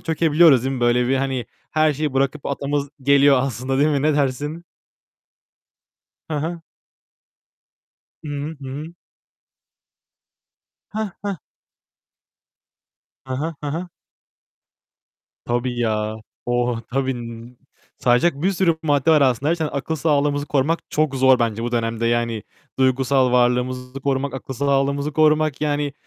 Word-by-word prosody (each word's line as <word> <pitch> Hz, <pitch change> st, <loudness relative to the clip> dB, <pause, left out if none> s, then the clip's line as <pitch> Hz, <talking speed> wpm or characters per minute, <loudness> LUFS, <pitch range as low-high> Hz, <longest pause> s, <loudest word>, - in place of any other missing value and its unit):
çökebiliyoruz 160 Hz, -4 st, +4 dB
değil 135 Hz, 0 st, -1 dB
mi? 125 Hz, -, -5 dB
Böyle 120 Hz, +1 st, +2 dB
bir, 135 Hz, -, +2 dB
hani, 130 Hz, -4 st, -2 dB, 0.2 s
her 155 Hz, 0 st, +3 dB
şeyi 150 Hz, 0 st, -2 dB
bırakıp 135 Hz, +2 st, 0 dB
atlamamız 140 Hz, 0 st, -2 dB
geliyor 140 Hz, 0 st, +5 dB
aslında 130 Hz, +1 st, -2 dB
değil 150 Hz, -, +4 dB
mi? 145 Hz, -3 st, +1 dB
Ne 155 Hz, 0 st, +2 dB
dersin? 145 Hz, +4 st, -1 dB, 1.7 s
Hı -, -, -1 dB
hı. 165 Hz, +3 st, -3 dB, 1.6 s
Hı 155 Hz, -, -8 dB
hı. 145 Hz, +2 st, -4 dB
Hı -, -, -6 dB
hı. 165 Hz, +3 st, -9 dB, 2.0 s
Heh 215 Hz, -1 st, -3 dB
heh. 200 Hz, -2 st, -2 dB, 1.9 s
He 130 Hz, -, -3 dB
he. 155 Hz, +5 st, -2 dB
He 145 Hz, -, -3 dB
he. 180 Hz, -, -4 dB, 1.6 s
Tabii 120 Hz, +1 st, -1 dB
ya. 110 Hz, -2 st, -1 dB, 0.3 s
Oh, 120 Hz, -1 st, 0 dB
tabii. 135 Hz, 0 st, 0 dB
N 120 Hz, 0 st, -9 dB, 0.4 s
sayacak 135 Hz, +5 st, +2 dB
bir 190 Hz, -, +3 dB
sürü 175 Hz, -3 st, +2 dB
madde 145 Hz, 0 st, +2 dB
var 155 Hz, -2 st, +5 dB
aslında. 135 Hz, +2 st, +2 dB
Her -, -, +3 dB
şeyden 160 Hz, -3 st, -2 dB
akıl 145 Hz, +3 st, -2 dB
sağlığımızı 145 Hz, -1 st, +1 dB
korumak 150 Hz, +4 st, +1 dB
çok 155 Hz, -2 st, +1 dB
zor 130 Hz, -1 st, +5 dB
bence 115 Hz, -1 st, -1 dB
bu 120 Hz, +1 st, -3 dB
dönemde. 115 Hz, 0 st, -1 dB
Yani, 115 Hz, -2 st, 0 dB, 0.4 s
duygusal 130 Hz, 0 st, +2 dB
varlığımızı 125 Hz, +2 st, +1 dB
korumak, 135 Hz, 0 st, -1 dB
akıl 135 Hz, 0 st, -6 dB
sağlığımızı 140 Hz, +2 st, 0 dB
korumak. 155 Hz, -1 st, +2 dB
Yani, 145 Hz, -1 st, -1 dB
140 Hz, 130 wpm, -21 LUFS, 125-150 Hz, 2.0 s, geliyor